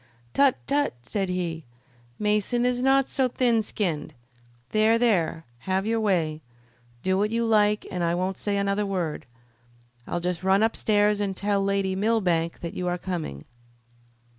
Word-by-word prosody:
"Tut! 275 -2 +4
tut!" 285 - +1
said 195 - -2
he; 170 -3 -3 0.5
"Mason 210 +4 +1
is 250 0 +1
not 270 +1 +4
so 265 -1 +1
thin 240 -2 +2
skinned. 160 -8 -3 0.6
There! 220 +1 +4
there! 175 -9 +1 0.2
Have 190 +1 +1
your 225 +1 +1
way! 165 -7 0 0.6
Do 190 0 +1
what 210 +1 +1
you 230 +1 0
like 210 -1 +3
and 180 -2 -2
I 170 0 +1
won't 185 +2 -2
say 205 -1 -1
another 200 +1 0
word. 180 -6 -3 0.8
I'll 175 - -2
just 175 -1 -3
run 190 +2 +3
upstairs 210 -2 +2
and 200 -2 -1
tell 200 0 0
Lady 195 -1 0
Millbank 190 -6 0
that 170 - -5
you 180 - -3
are 175 0 0
coming." 170 - -5
200 Hz, 155 wpm, -25 LUFS, 180-220 Hz, 0.8 s, Tut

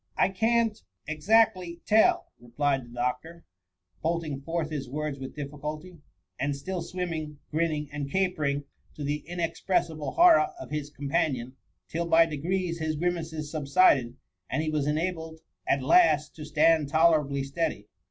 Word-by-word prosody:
I - - +4
can't 225 +2 +1
— - - -37
exactly 185 -1 +2
— - - -50
^tell,'' 220 +1 +4 0.2
replied 135 +2 -1
the - - -16
doctor, 125 +8 -4 0.6
bolting 160 -4 -2
forth 165 +1 -3
his 135 -4 -4
words 150 0 -3
with 130 0 -7
difficulty, 150 +4 -6 0.4
and 140 0 0
still 180 +5 -4
swimming, 165 -5 -4
grinning, 155 -2 0
and 145 -1 -4
capering, 155 -6 0 0.3
to 150 - -6
the 145 +1 -1
in« 175 0 -5
expressible 165 -2 -1
horror 350 +2 +6
of - - -9
his 150 -1 -3
companion, 140 -4 -2 0.3
till 170 +1 -3
«by 165 0 +6
de 155 -2 -5
grees 175 +2 -2
his 160 -1 -1
grimaces 160 -2 -3
subsided, 140 -5 +3 0.3
and 145 +5 -1
he 155 - -1
was 150 -2 0
enabled 160 +1 -2 0.3
at 135 -1 +2
last 150 - +4
to - - -9
s^and 155 0 +3
tolerably 155 -3 +3
steady. 140 -5 -2
155 Hz, 150 wpm, -27 LUFS, 145-170 Hz, 0.6 s, horror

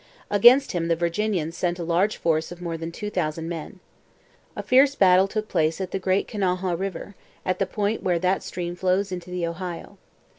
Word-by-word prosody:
Against 240 +7 +6
him 170 -3 -1
the 165 - +2
Virginians 170 -1 -1
sent 175 -1 -1
a 175 - -4
large 175 +5 +1
force 160 -1 0
of 175 - -9
more 170 -2 -4
than 165 +1 -5
two 210 +4 -6
thousand 165 -3 -2
men. 170 +2 -6 0.8
A - - -5
fierce 270 +2 +4
battle 190 -2 +5
took 215 +1 -3
place 160 -2 0
at 190 -1 -4
the 195 - -2
Great 190 +1 0
Kanawha 185 -3 -1
river, 195 +2 -5 0.3
at 185 - -1
the 195 - +1
point 210 +3 -1
where 180 -2 +1
that 185 +2 +1
stream 175 -1 -5
flows 185 +2 0
into 180 -1 -6
the 180 -1 -2
Ohio. 170 0 -6
180 Hz, 195 wpm, -24 LUFS, 170-195 Hz, 0.8 s, Against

